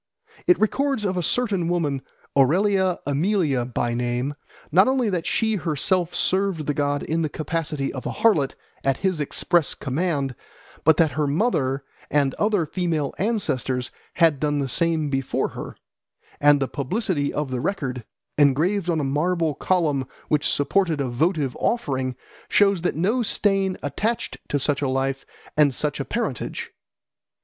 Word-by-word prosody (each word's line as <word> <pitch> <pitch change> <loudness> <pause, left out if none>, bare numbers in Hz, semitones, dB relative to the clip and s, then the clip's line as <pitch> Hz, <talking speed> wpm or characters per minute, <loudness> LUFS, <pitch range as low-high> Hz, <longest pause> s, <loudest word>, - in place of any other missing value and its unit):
It 360 - +5
records 270 +1 +1
of 190 -1 0
a 180 - 0
certain 195 -2 0
woman, 155 -6 0 0.3
Aurelia 185 +6 +3
Aemilia 145 - +1
by 120 0 -1
name, 120 +3 -1 0.4
not 185 +6 +6
only 260 -5 +2
that 175 -2 -2
she 220 -2 +1
herself 175 +2 0
served 190 -5 +1
the 145 - 0
god 145 0 0
in 165 +1 -1
the 155 - 0
capacity 155 -2 -3
of 130 - -5
a - - -2
harlot 160 -12 +2 0.3
at 135 -1 +1
his 185 -5 +1
express 170 +2 +1
command, 140 -1 -1 0.5
but 160 -2 +5
that 160 -3 +4
her 150 +3 0
mother 140 - 0 0.3
and 140 -2 +2
other 205 -5 +2
female 160 -4 -1
ancestors 130 - -1 0.2
had 165 -5 +4
done 145 0 0
the 140 -1 0
same 160 +1 0
before 135 -1 0
her; - - -8 0.6
and 145 0 +5
the 135 - 0
publicity 145 - -1
of 145 -2 -3
the 125 -1 -2
record, 130 - -2 0.4
engraved 165 +7 +3
on 165 -2 +1
a - - -1
marble 160 +3 +1
column 150 -5 0 0.2
which 150 -1 +2
supported 160 +2 +1
a 135 -2 -1
votive 145 +1 0
offering, 130 - -1 0.3
shows 200 -3 +4
that 180 - 0
no 205 +10 +1
stain 195 -4 +1
attached 210 - -2
to 145 - +1
such 145 +1 0
a 140 - 0
life 135 +1 -1 0.3
and 145 -3 +4
such 150 -1 0
a 140 - -2
parentage. 210 - -3
155 Hz, 155 wpm, -23 LUFS, 140-185 Hz, 0.6 s, not